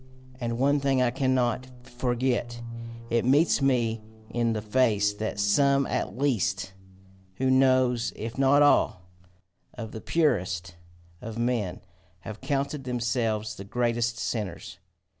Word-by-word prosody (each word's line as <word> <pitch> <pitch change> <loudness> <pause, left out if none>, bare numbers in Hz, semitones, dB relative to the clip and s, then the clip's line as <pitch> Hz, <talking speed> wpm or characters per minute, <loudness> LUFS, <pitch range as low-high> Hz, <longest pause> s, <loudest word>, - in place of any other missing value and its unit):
And 115 -2 -2
one 140 +3 +3
thing 135 -1 +1
I 125 -1 +3
cannot 130 -1 0 0.2
forget 120 -1 -1 0.5
it 115 0 +2
meets 145 +5 +3
me 120 -5 +1 0.3
in 120 -1 +1
the 110 - -2
face 105 -3 +2
that 105 0 -4
some 140 +7 +3
at - - -3
least, 100 -8 0 0.6
who 130 +3 +1
knows 130 -2 +3
if 115 +1 -6
not 135 +2 +4
all? 120 -10 +3 0.7
of 115 -3 -6
the 110 - -7
purest 90 - 0 0.5
of 115 0 -7
men 115 -6 -1 0.4
have 110 +2 -8
counted 140 +1 -2
themselves 115 -3 -1
the 100 - -9
greatest 120 +2 -1
sinners! 105 -8 -4
120 Hz, 125 wpm, -27 LUFS, 110-130 Hz, 0.7 s, not